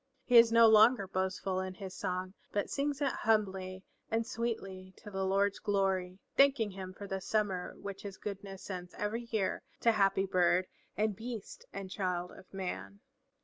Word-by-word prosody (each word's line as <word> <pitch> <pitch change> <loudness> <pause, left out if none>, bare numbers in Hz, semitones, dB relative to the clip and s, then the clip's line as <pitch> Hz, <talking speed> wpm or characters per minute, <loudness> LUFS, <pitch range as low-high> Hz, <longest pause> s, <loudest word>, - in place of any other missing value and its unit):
He 245 - +2
is 230 0 +6
no 230 0 +8
longer 220 -1 +6
boastful 185 0 -1
in 185 0 -4
his 190 -1 -7
song, 185 0 -3 0.2
but 205 - -1
sings 285 0 -1
it 275 - +2
humbly 190 -4 0 0.3
and 225 0 0
sweetly 195 -6 -4
to 210 - -11
the 190 0 -2
Lord's 195 +1 +2
glory, 190 -2 0 0.2
thanking 275 -6 +4
him 185 -1 -7
for 200 +2 -9
the 195 -1 -3
summer 195 -3 -1
which 200 -1 -7
his 200 -2 -7
goodness 195 -1 -7
sends 180 -2 -6
every 230 +3 -3
year 215 -4 0 0.2
to 230 - +5
happy 195 -2 +3
bird 180 -1 +3 0.3
and 210 0 +1
beast 225 -1 -7
and 195 -1 -6
child 180 -3 -2
of 185 - -15
man. 100 - -5
195 Hz, 170 wpm, -33 LUFS, 185-220 Hz, 0.3 s, no